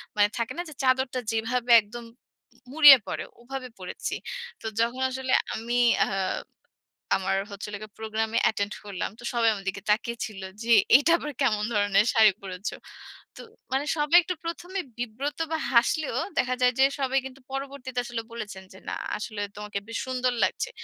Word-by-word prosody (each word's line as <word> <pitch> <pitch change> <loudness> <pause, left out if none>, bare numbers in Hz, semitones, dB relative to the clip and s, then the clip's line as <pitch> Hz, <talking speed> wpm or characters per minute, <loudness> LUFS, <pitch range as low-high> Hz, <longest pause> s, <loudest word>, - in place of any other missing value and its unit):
মানে 205 0 +5
থাকে 235 +2 -2
না - - -1
যে 310 - -10
চাদরটা 255 0 +2
যেভাবে 235 +2 -1
একদম 235 +3 -9 0.7
মুড়িয়ে 290 -2 +10
পরে - - -3 0.2
ওভাবে 260 +1 -6
পরেছি। 180 - -5 0.5
তো - - -12 0.2
যখন 240 +3 0
আসলে 260 0 -3 0.2
আমি 235 +2 -3 0.3
আ - - -6 1.1
আমার 195 0 0
হচ্ছিলো 205 +1 -6
গিয়ে 215 -1 -10
প্রোগ্রামে 220 +1 -1
অ্যাটেন্ড 205 -1 +1
করলাম। 195 -4 -4
তো - - -13
সবাই 230 -1 +3
আমার 195 -2 -6
দিকে 195 +1 -4
তাকিয়ে 235 +2 +1
ছিল 200 -3 -9 0.2
যে, 235 - +2 0.2
এটা 290 +4 +2
আবার 295 - -5
কেমন 215 -6 +2
ধরনের 205 +1 +3
শাড়ি 220 -3 +7
পরেছ? 185 +1 -5 0.7
তো - - -10 0.3
মানে 270 +2 0
সবাই 300 +3 +5
একটু 360 0 -3
প্রথমে 355 +3 -4 0.2
বিব্রত 245 +5 -4
বা 320 - +1
হাসলেও 260 +6 +2 0.2
দেখা 255 0 +2
যায় 250 0 +4
যে, - - +7 0.2
সবাই 270 0 +2
কিন্তু 265 0 -10
পরবর্তীতে 270 -2 -4
আসলে 240 -1 -4
বলেছেন 210 -4 -7
যে, - - -13
না - - -3 0.2
আসলে 210 0 -5
তোমাকে 210 -1 -5
বেশ 230 - -4
সুন্দর 255 -1 0
লাগছে। 190 - 0
235 Hz, 165 wpm, -26 LUFS, 210-265 Hz, 1.1 s, মুড়িয়ে